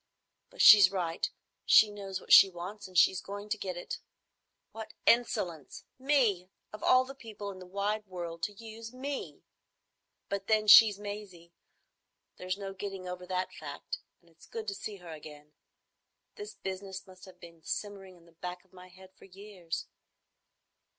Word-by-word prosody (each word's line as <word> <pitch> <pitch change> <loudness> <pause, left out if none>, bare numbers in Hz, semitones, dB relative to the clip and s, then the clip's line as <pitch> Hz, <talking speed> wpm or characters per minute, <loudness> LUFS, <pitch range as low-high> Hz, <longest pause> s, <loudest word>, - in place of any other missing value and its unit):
But - - -1
she's 200 -4 +9
right. 175 -4 -2 0.3
She 215 -1 +6
knows 195 -2 -6
what - - +1
she 195 - +10
wants, 190 +4 -8
and 185 -1 -7
she's 185 +1 +5
going 205 +1 -8
to 215 - -1
get 185 -3 -4
it. 175 - -6 0.7
What 220 0 -9
insolence! 210 - +1 0.2
Me! 245 -10 +1 0.2
Of 215 - -9
all 255 0 +4
the 270 - -9
people 220 -6 -8
in 185 - -11
the 185 - -11
wide 205 +3 -2
world, 170 -2 -7
to 210 - -6
use 225 +1 -10
me! 270 +2 -6 0.8
But 200 -1 -4
then 215 -1 +2
she's 210 -1 +9
Maisie. 205 -5 -9 0.8
There's 185 +1 -3
no 195 -1 -6
getting 195 -1 -6
over 180 0 -7
that 185 0 -2
fact; 145 -2 -7 0.2
and 170 -1 -26
it's 165 - -19
good 220 -1 -7
to - - -3
see 205 +2 -7
her 175 -3 -11
again. 150 -1 -12 0.8
This 415 -1 -9
business 190 0 -6
must 185 -1 -15
have 185 -2 -16
been 170 -2 -14
simmering 195 -2 -6
at 170 - -22
the 170 - -20
back 180 +2 -8
of 190 - -33
my 180 0 -13
head 185 +1 -17
for - - -18
years.... 190 -3 -7
195 Hz, 170 wpm, -30 LUFS, 180-210 Hz, 0.8 s, she